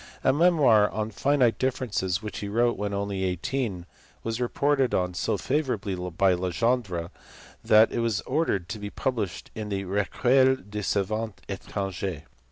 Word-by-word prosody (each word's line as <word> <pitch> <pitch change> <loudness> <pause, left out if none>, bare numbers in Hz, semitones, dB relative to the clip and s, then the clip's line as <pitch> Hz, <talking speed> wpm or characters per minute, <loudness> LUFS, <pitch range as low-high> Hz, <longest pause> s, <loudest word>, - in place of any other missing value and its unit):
A 130 - +4
memoir 145 -10 +5
on 110 0 -3
finite 130 0 +2
differences 110 -8 -1
which 105 - -5
he 100 - -4
wrote 120 +3 +2
when 105 +1 -3
only 100 -1 -2
eighteen 95 +1 -2 0.4
was 115 +2 -3
reported 135 +2 +1
on 90 0 0
so 90 - -1
favourably 125 -8 -1
by 90 +1 +1
Legendre 90 -1 -1 0.5
that 110 +1 +6
it - - -2
was 115 -3 0
ordered 130 - 0
to 110 - -5
be 105 0 -5
published 105 -7 -3
in 110 -1 -5
the 100 -1 -2
Recueil 125 +7 +3
des 105 -3 -7
savants 105 +2 -1
etran 100 0 -4
gers. 90 -4 -4
105 Hz, 155 wpm, -26 LUFS, 95-125 Hz, 0.5 s, that